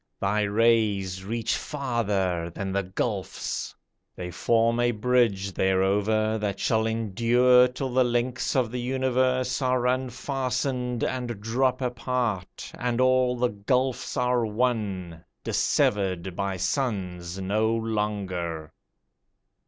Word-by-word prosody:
Thy 105 +2 +1
rays 105 -3 +2
reach 115 +3 -1
farther 100 - -1
than 95 +3 -5
the 100 +1 +1
gulfs; 95 0 -3 0.4
They 90 0 -6
form 115 +6 +2
a 120 0 +3
bridge 115 -4 +1
thereover, 105 +4 +1
That 100 -2 -2
shall 110 0 +1
endure 120 +3 +4
till 130 0 -4
the 130 0 +4
links 120 +1 -1
of 125 -4 +1
the 125 - -3
universe 130 0 0
Are 125 -1 +1
unfastened, 125 -1 -1
and 120 -4 -2
drop 125 +4 0
apart, 125 -5 -2
And 120 0 -2
all 130 -1 +3
the 125 0 +2
gulfs 125 +7 -1
are 125 -1 +2
one, 105 -7 -2 0.2
Dissevered 95 -3 0
by 100 -1 -2
suns 90 - -2
no 105 +4 +1
longer. 100 -8 -2
115 Hz, 115 wpm, -26 LUFS, 100-125 Hz, 0.4 s, endure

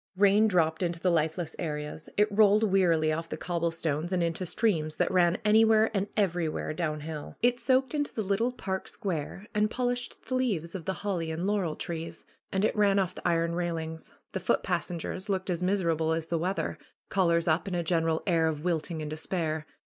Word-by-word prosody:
Eain 205 +2 +5
dropped 160 -4 +2
into 170 -2 -1
the 180 +1 +2
lifeless 160 0 0
areas. 150 -2 -4
It 210 0 +2
rolled 210 0 +5
wearily 175 -6 +3
off 165 +1 -4
the - - -4
cobblestones 165 -2 -2
and 180 -2 +1
into 170 +2 -2
streams 160 -8 +1
that - - +1
ran 180 -1 +3
anywhere 220 +1 +5
and 200 -1 0
everywhere 175 -6 0
downhill. 155 -2 -4
It 245 0 +3
soaked 260 +1 +2
into 290 -1 0
the 220 - -3
little 205 +5 +1
park 190 -6 -4
square 190 +1 -4
and 210 0 +2
polished 245 0 -2
the - - -3
leaves 205 -11 0
of 180 -4 -6
the 190 - -1
holly 175 -5 -1
and 160 +3 -3
laurel 195 -6 0
trees. 165 -1 -6 0.3
And 190 +2 +1
it - - 0
ran 200 -2 +3
off 185 -2 +1
the - - -4
iron 170 -1 +1
railings. 165 -2 -3 0.2
The 190 - -3
foot 185 - +1
passengers 175 +3 -3
looked 190 -1 -1
as 175 0 -2
miserable 170 -4 +1
as 160 0 -1
the 165 0 -1
weather, 185 +4 -2 0.3
collars 170 -3 +2
up 160 +4 +2
and 185 - -2
a 175 - 0
general 165 -1 +1
air 165 -4 +3
of 155 -1 -2
wilting 165 -2 -1
and 150 - -4
despair. 155 -1 -2
175 Hz, 195 wpm, -29 LUFS, 160-200 Hz, 0.3 s, Eain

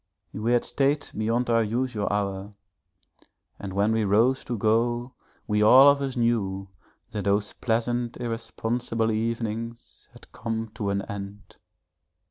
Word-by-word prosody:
We 110 +3 0
had 120 - +2
stayed 140 +1 +1
beyond 115 +3 0
our 115 0 +4
usual 115 -1 -1
hour 100 0 -2 1.0
and 100 - -6
when 100 +3 +1
we 110 0 +1
rose 115 +6 +3
to 120 - -3
go 120 +4 +1 0.3
we 105 -1 +1
all 130 +6 +8
of 140 0 -1
us 135 -2 -3
knew 100 -5 0 0.4
that 100 -2 -4
those 100 +1 +1
pleasant 120 +1 -1
irresponsible 115 -1 -2
evenings 115 +1 -4
had - - -17
come 115 -1 -4
to 105 -3 -3
an 100 0 -1
end. 100 0 -8
115 Hz, 135 wpm, -26 LUFS, 105-120 Hz, 1.0 s, all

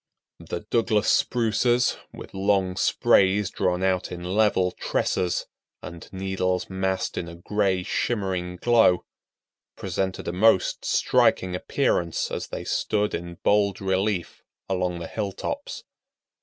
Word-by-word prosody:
The - - -5
Douglas 110 -2 +1
Spruces, 120 +1 +2 0.2
with - - -11
long 95 -1 +1
sprays 95 +1 +3
drawn 90 0 0
out 95 -1 0
in 90 -1 -6
level 95 -1 +2
tresses, 90 0 -1 0.4
and 85 0 -9
needles 95 -1 -2
massed 95 0 -1
in 85 - -5
a 85 - -9
gray, 95 +1 0
shimmering 95 -5 -2
glow, 115 -5 +4 0.7
presented 95 -1 -3
a 85 - -2
most 95 0 +3
striking 90 -1 +2
appearance 85 -2 0
as - - -4
they - - -6
stood 105 -1 0
in 85 0 -5
bold 100 -2 +2
relief 95 -1 -1 0.3
along 90 -2 -1
the 85 - -6
hilltops. 105 - -4
95 Hz, 120 wpm, -25 LUFS, 90-105 Hz, 0.7 s, glow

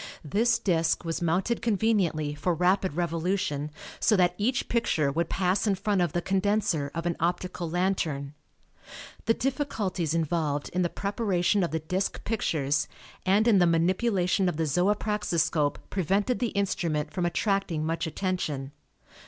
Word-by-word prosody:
This 230 +10 +2
disk 165 -3 +1
was 165 0 -2
mounted 180 +8 0
conveniently 200 -9 +1
for 170 +4 -1
rapid 185 +1 +2
revolution 170 -3 -1 0.3
so 220 - +4
that 175 -1 +3
each 235 +7 0
picture 160 -12 +1
would 165 +3 -1
pass 190 +2 +1
in 200 - +3
front 200 0 0
of 175 -4 0
the 175 - -1
condenser 195 -6 +1
of 165 0 -3
an 170 -1 0
optical 175 0 -2
lantern. 160 -6 -1 0.9
The 225 - +3
difficulties 215 - -1
involved 155 -3 -1
in 180 - -1
the 175 - +1
preparation 200 -1 0
of 170 - 0
the 160 - -1
disk 185 +5 -2
pictures 145 -10 0 0.4
and 205 +4 +4
in 210 -5 +5
the 175 - +5
manipulation 180 +2 +2
of 165 - -4
the 160 - +1
zoopraxiscope 175 -3 +1
prevented 200 +6 +1
the 245 - +1
instrument 170 -6 -1
from 180 -2 0
attracting 195 -4 0
much 165 +1 -1
attention. 155 -6 -2
180 Hz, 145 wpm, -27 LUFS, 160-200 Hz, 0.9 s, in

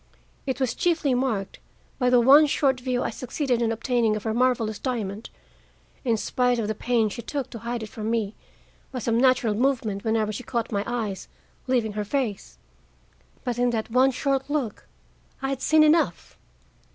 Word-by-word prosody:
It 260 -1 -2
was 260 -3 0
chiefly 325 -6 +1
marked 240 -6 -1 0.4
by 250 -1 +3
the 250 -1 +5
one 280 +5 +7
short 270 -2 +1
view 250 -1 -1
I - - -2
succeeded 250 +1 -2
in 230 -1 +1
obtaining 230 -1 +1
of 215 - -5
her 220 - -1
marvelous 235 -3 +1
diamond, 220 -5 -3 0.7
in 230 -3 +1
spite 245 +2 +1
of 225 -3 -1
the 215 - -1
pains 225 -1 0
she - - -6
took 275 +2 -4
to 230 - -7
hide 235 0 -4
it 215 - -7
from 215 +1 -5
me 220 -3 -1 0.6
by 260 - -5
some 230 -1 0
natural 255 -4 +3
movement 225 -4 0
whenever 220 -1 +1
she 215 - -5
caught 235 -1 -3
my 200 -1 0
eyes 220 -5 -3 0.4
leaving 240 -5 +1
her 210 0 -2
face. 225 -2 -3 0.9
But 245 -2 -2
in 245 0 +3
that 225 -1 -2
one 255 +3 +5
short 270 +1 -1
look 285 -8 -3 0.5
I 270 - -2
had 270 -1 -3
seen 315 0 +5
enough. 310 +2 +2
240 Hz, 180 wpm, -25 LUFS, 220-260 Hz, 0.9 s, one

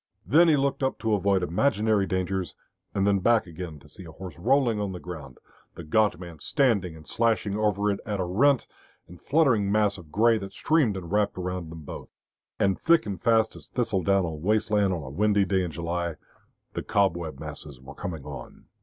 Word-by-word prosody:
Then 155 - +5
he 155 -3 +5
looked 140 0 0
up 130 0 0
to 110 0 -1
avoid 100 -2 +2
imaginary 105 +1 +1
dangers, 95 -1 -2 0.4
and 100 -1 0
then 100 -1 +3
back 115 +3 +3
again 85 -2 -7
to 75 - -17
see 95 - -11
a 80 - -10
horse 90 -1 -9
rolling 120 0 +2
on 100 -2 -2
the 90 - -6
ground, 80 -8 -9 0.4
the 85 - -8
gaunt 105 +5 +2
man 85 -4 -9
standing 105 - +1
and 80 -1 -13
slashing 110 -4 0
over 105 -1 +1
it 100 - -3
at 105 -2 -3
a - - +1
rent 125 +9 +3 0.4
and 90 0 -14
fluttering 130 -10 +2
mass 105 -2 +2
of 80 -3 -14
grey 115 +3 +3
that 100 -1 -8
streamed 140 -6 +2
and 85 -2 -8
wrapped 105 -1 +1
about 90 -2 -4
them 80 0 -9
both. - - -8 0.5
And 100 -1 +2
thick 170 0 +4
and 100 -5 -5
fast 110 -1 +3
as - - -13
thistle 115 -6 -1
down 95 +2 +2
on 80 -2 -5
waste 105 +4 +1
land 105 -2 +3
on 85 -4 -3
a 65 - -7
windy 105 +4 +2
day 95 0 +1
in 90 - -2
July, 85 +1 -3 0.6
the - - -3
cobweb 85 -7 0
masses 75 -3 -9
were 65 +2 -11
coming 80 0 -6
on. - - -9
100 Hz, 205 wpm, -26 LUFS, 85-110 Hz, 0.6 s, Then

